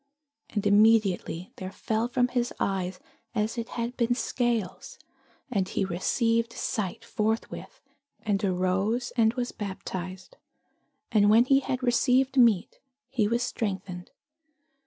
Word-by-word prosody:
And 205 Hz, -2 st, -2 dB
immediately 205 Hz, -4 st, +3 dB
there 185 Hz, -1 st, -6 dB
fell 220 Hz, +3 st, -1 dB
from 245 Hz, 0 st, +1 dB
his 245 Hz, -1 st, 0 dB
eyes 185 Hz, -2 st, -1 dB, 0.4 s
as 215 Hz, +1 st, 0 dB
it 230 Hz, -1 st, -4 dB
had 235 Hz, +1 st, -2 dB
been 240 Hz, 0 st, +2 dB
scales: 235 Hz, -7 st, -2 dB, 0.5 s
and 195 Hz, -5 st, 0 dB
he -, -, 0 dB
received 230 Hz, +6 st, 0 dB
sight 210 Hz, -7 st, -3 dB
forthwith, 220 Hz, +1 st, -3 dB, 0.4 s
and 210 Hz, -2 st, 0 dB
arose, 190 Hz, +5 st, 0 dB
and 225 Hz, -1 st, +3 dB
was 245 Hz, -1 st, -2 dB
baptized. 190 Hz, -, -6 dB, 0.7 s
And 205 Hz, -2 st, +5 dB
when 225 Hz, +3 st, +6 dB
he 270 Hz, +1 st, +5 dB
had 260 Hz, -1 st, -3 dB
received 250 Hz, +2 st, +3 dB
meat, 230 Hz, -8 st, +3 dB, 0.3 s
he 220 Hz, -6 st, +1 dB
was 235 Hz, +2 st, +1 dB
strengthened. 190 Hz, -6 st, -4 dB
220 Hz, 125 wpm, -27 LUFS, 195-240 Hz, 0.7 s, when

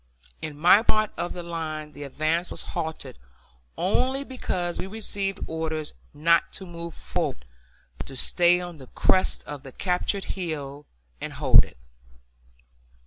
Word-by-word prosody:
In 150 Hz, -2 st, -5 dB
my 175 Hz, +7 st, +7 dB
part 215 Hz, -2 st, +2 dB
of 175 Hz, -, -2 dB
the 175 Hz, -, -5 dB
line 155 Hz, -3 st, -4 dB
the 145 Hz, -, -11 dB
advance 155 Hz, +5 st, 0 dB
was -, -, -5 dB
halted 160 Hz, -, -4 dB, 0.6 s
only 255 Hz, +9 st, +2 dB
because 185 Hz, -10 st, -2 dB
we -, -, -2 dB
received 200 Hz, -2 st, -2 dB
orders 160 Hz, -1 st, -3 dB, 0.2 s
not 165 Hz, +3 st, +3 dB
to 195 Hz, -, -5 dB
move 170 Hz, -1 st, -7 dB
forward, 60 Hz, -, -2 dB, 0.5 s
but -, -, -5 dB
to 135 Hz, -, -7 dB
stay 175 Hz, +6 st, +4 dB
on 175 Hz, -2 st, -6 dB
the 130 Hz, -, -11 dB
crest 185 Hz, +8 st, +2 dB
of 145 Hz, -2 st, -6 dB
the 135 Hz, -, -10 dB
captured 185 Hz, +5 st, 0 dB
hill 150 Hz, -6 st, -4 dB, 0.3 s
and -, -, -4 dB
hold -, -, +7 dB
it. -, -, -14 dB
170 Hz, 145 wpm, -26 LUFS, 155-185 Hz, 0.6 s, my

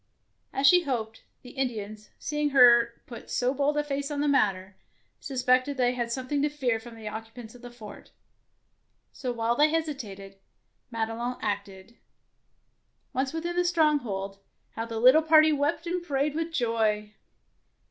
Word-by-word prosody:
As 270 Hz, -, -1 dB
she 355 Hz, +5 st, +7 dB
hoped, 230 Hz, -7 st, -4 dB, 0.2 s
the 250 Hz, -, -11 dB
Indians, 215 Hz, -5 st, -4 dB
seeing 295 Hz, 0 st, -2 dB
her 240 Hz, -3 st, +5 dB
put 235 Hz, -, -11 dB
so 255 Hz, +1 st, 0 dB
bold 285 Hz, +2 st, 0 dB
a 295 Hz, -, +1 dB
face 280 Hz, 0 st, -3 dB
on 295 Hz, -1 st, -3 dB
the 295 Hz, -, +1 dB
matter, 200 Hz, -8 st, +1 dB, 0.4 s
sus 260 Hz, -3 st, -5 dB
pected 255 Hz, 0 st, +4 dB
that 285 Hz, -1 st, -4 dB
they 250 Hz, -1 st, +2 dB
had 240 Hz, -2 st, -3 dB
something 260 Hz, +3 st, -2 dB
to 295 Hz, -, +1 dB
fear 255 Hz, -6 st, -1 dB
from 230 Hz, +1 st, -12 dB
the 220 Hz, -1 st, -9 dB
occupants 225 Hz, +1 st, -8 dB
of 245 Hz, -, -15 dB
the 245 Hz, -, -9 dB
fort; 240 Hz, -3 st, -12 dB, 1.0 s
so, 255 Hz, -3 st, -4 dB
while 235 Hz, 0 st, 0 dB
they 300 Hz, +4 st, +4 dB
hesitated, 220 Hz, -12 st, -4 dB, 0.5 s
Madelon 230 Hz, +2 st, -3 dB
acted. 200 Hz, +2 st, -5 dB, 1.1 s
Once 265 Hz, +1 st, -1 dB
within 340 Hz, +2 st, -4 dB
the 355 Hz, -, +2 dB
stronghold, 275 Hz, -, 0 dB, 0.3 s
how 225 Hz, +1 st, -5 dB
the 225 Hz, -1 st, -4 dB
little 255 Hz, +7 st, +7 dB
party 315 Hz, 0 st, +5 dB
wept 290 Hz, +3 st, -1 dB
and 350 Hz, +1 st, -2 dB
prayed 285 Hz, -3 st, -1 dB
with 325 Hz, +1 st, -3 dB
joy! 220 Hz, -6 st, 0 dB
250 Hz, 160 wpm, -27 LUFS, 225-290 Hz, 1.1 s, she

